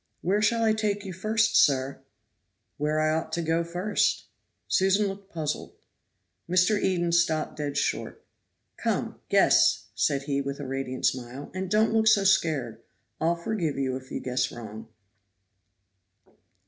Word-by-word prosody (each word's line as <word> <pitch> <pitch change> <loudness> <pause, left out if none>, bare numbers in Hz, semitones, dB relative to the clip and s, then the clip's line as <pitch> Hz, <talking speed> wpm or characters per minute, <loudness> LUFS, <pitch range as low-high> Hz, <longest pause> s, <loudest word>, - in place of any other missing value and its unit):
"Where 200 +4 +1
shall 230 +2 +2
I 220 -1 +4
take 210 -2 -1
you 190 - -5
first, 220 +4 +1
sir?" 135 -1 +3 0.8
"Where 150 +1 0
I 155 0 +2
ought 160 0 -2
to 170 - 0
go 165 +1 +1
first." 180 +5 0 0.4
Susan 195 +2 +3
looked 195 0 -6
puzzled. 155 -3 -4 0.8
Mr. 185 +4 +3
Eden 175 -2 +1
stopped 165 -2 +1
dead 145 -1 -3
short. - - -2 0.5
"Come, - - -2
guess," - - +4
said 140 -1 0
he, 140 -1 -1
with 140 +1 -5
a 145 - -5
radiant 130 -1 -3
smile, 130 +3 -2
"and 185 0 -4
don't 215 +2 +3
look 220 0 +3
so 215 -2 +5
scared. 145 - +1 0.4
I'll 165 +2 +2
forgive 170 -4 -2
you 130 -1 -1
if 130 0 -9
you - - -4
guess 125 0 -1
wrong." 110 -1 -9
165 Hz, 150 wpm, -27 LUFS, 140-195 Hz, 0.8 s, so